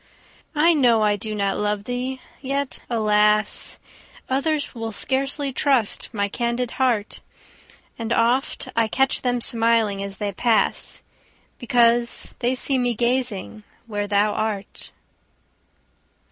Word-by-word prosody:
I 325 +3 +5
know 240 -7 +4
I 210 -1 +3
do 215 +1 -5
not 200 -1 -1
love 210 -1 -1
thee! 250 +3 -4 0.2
yet, 275 0 -3
alas! 210 -2 +1 0.5
Others 285 +3 0
will 225 -2 -5
scarcely 270 +4 -1
trust 260 -6 +1
my 200 -3 -1
candid 235 +3 -2
heart; 235 -5 0 0.8
And 230 0 -4
oft 240 +3 +1
I 230 -1 +3
catch 265 +4 +2
them 245 -1 0
smiling 230 -4 +2
as 200 -1 -6
they 205 0 -2
pass, 225 +3 0 0.6
Because 235 -1 +2
they 250 +1 +1
see 265 +1 0
me 245 -1 0
gazing 235 - -1 0.2
where 205 -2 -3
thou 205 +1 +2
art. 210 -2 -4
235 Hz, 120 wpm, -23 LUFS, 210-255 Hz, 0.8 s, I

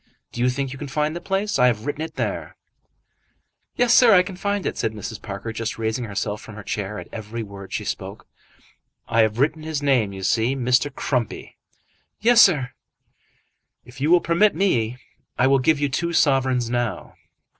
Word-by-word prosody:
Do 120 - -5
you 125 - +3
think 135 +1 -3
you 135 - -10
can 145 - -5
find 150 +3 -1
the 175 - -5
place? 195 -4 -1
I 125 - +6
have 110 -2 0
written 145 +1 -3
it 160 - -5
there." - - -3 1.2
"Yes, 245 -1 +3
sir, 240 -5 +7
I 180 - +6
can 190 0 -8
find 200 +1 -2
it," - - -2
said 110 -2 -2
Mrs. 105 0 -7
Parker, 100 +3 -6
just 115 +1 -4
raising 115 +2 -2
herself 105 0 -3
from 110 - -11
her 105 - -9
chair 105 0 -4
at - - -8
every 110 +1 -6
word 100 -2 -10
she - - -3
spoke. - - -6 0.8
"I 115 - +3
have 110 0 +1
written 155 +4 +1
his 155 -2 -4
name, 125 -8 +2
you 95 -1 -8
see. 115 +7 +1
Mr. 130 +2 +1
Crumpy." 125 -4 -3 0.6
"Yes, 235 +2 +6
sir." 145 - +4 1.1
"If 125 +2 -13
you 150 - +1
will 175 0 +6
permit 170 +5 +3
me, 125 - +1 0.4
I 130 - +3
will 135 0 +4
give 150 +3 +2
you 145 - +1
two 170 +5 -2
sovereigns 130 -5 +2
now." 120 -3 -3
130 Hz, 190 wpm, -23 LUFS, 110-155 Hz, 1.2 s, sir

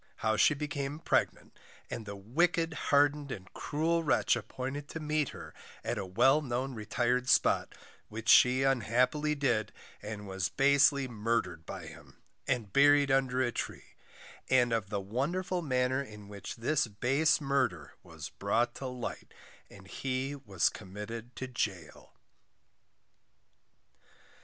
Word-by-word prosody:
How 110 0 +3
she 155 - +4
became 145 -1 -3
Pregnant, - - -1 0.3
and 110 - -6
the 100 - -5
wicked 165 - +1 0.2
hardened, 145 0 +3
and 95 -5 -8
cruel 165 +3 0
Wretch 150 - +3
appointed 135 +3 -5
to 165 - -6
meet 150 -2 0
her - - -10 0.3
at - - -2
a 95 - -4
well 130 +10 +4
known 130 0 -3
retired 125 +3 -1
spot, - - +3 0.3
which 110 +2 -7
she 125 +2 +6
unhappily 135 +4 +1
did, 120 -7 0 0.3
and 105 -1 -7
was 95 -2 -2
basely 140 - +4
Murdered 105 -8 -2
by - - -7
him, - - -13 0.3
and 115 -7 -1
buried 145 0 +5
under 130 -1 +2
a 120 - 0
Tree, - - -6 0.6
and 125 -2 +4
of 110 -4 -1
the 100 -1 -1
wonderful 155 - -2
manner 130 -2 +1
in 105 -6 -10
which 100 -1 -7
this 135 +4 +1
base 135 +8 +2
Murder 135 - -1
was - - -9
brought 120 0 0
to 135 - -6
light, 125 -2 -6 0.4
and 95 -1 -14
he 135 +5 -3
was 100 -11 0
committed 110 +4 -8
to 130 - -4
Gaol. 100 -10 -5
125 Hz, 140 wpm, -31 LUFS, 110-140 Hz, 0.6 s, she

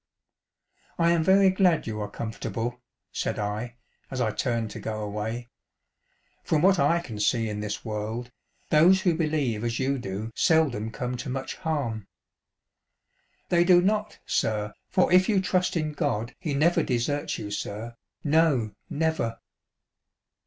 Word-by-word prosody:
"I 170 0 +4
am 170 -2 +2
very 190 +2 +5
glad 185 -4 +3
you 110 -2 -4
are 105 - -4
comfortable/' 115 +2 -4 0.3
said. - - -2
I, 105 +3 -3 0.3
as 130 - -4
I 115 -3 +1
turned 115 -1 -1
to - - -7
go 110 -1 -4
away. 110 +3 -4 0.5
" - - -43
From 155 0 +1
what 190 0 +5
I 155 +5 +3
can 115 -10 -8
see 115 +2 +2
in 105 -1 -4
this 105 +3 -4
world, 110 +3 -4 0.4
those 175 +5 +6
who 180 -4 +2
believe 150 -9 0
as 120 0 -1
you 135 +1 0
do 105 0 -5
seldom 135 -10 +2
come 125 +2 -4
to 135 - -5
much 130 +1 -4
harm." 135 - -2 0.7
" - - -45
They 175 -1 +4
do 175 0 +6
not, 210 +3 0
sir, 105 -1 0 0.2
for 185 -1 +2
if 185 +2 +5
you 205 -3 +4
trust 185 -1 +1
in 155 -1 -1
God 125 -7 -1
he 155 -6 -2
never 165 +5 +3
deserts 135 +3 -1
you, 105 - -6
sir; 110 +3 -5 0.3
no 150 -8 +3 0.2
never." 160 -7 -1
130 Hz, 155 wpm, -26 LUFS, 110-165 Hz, 0.7 s, those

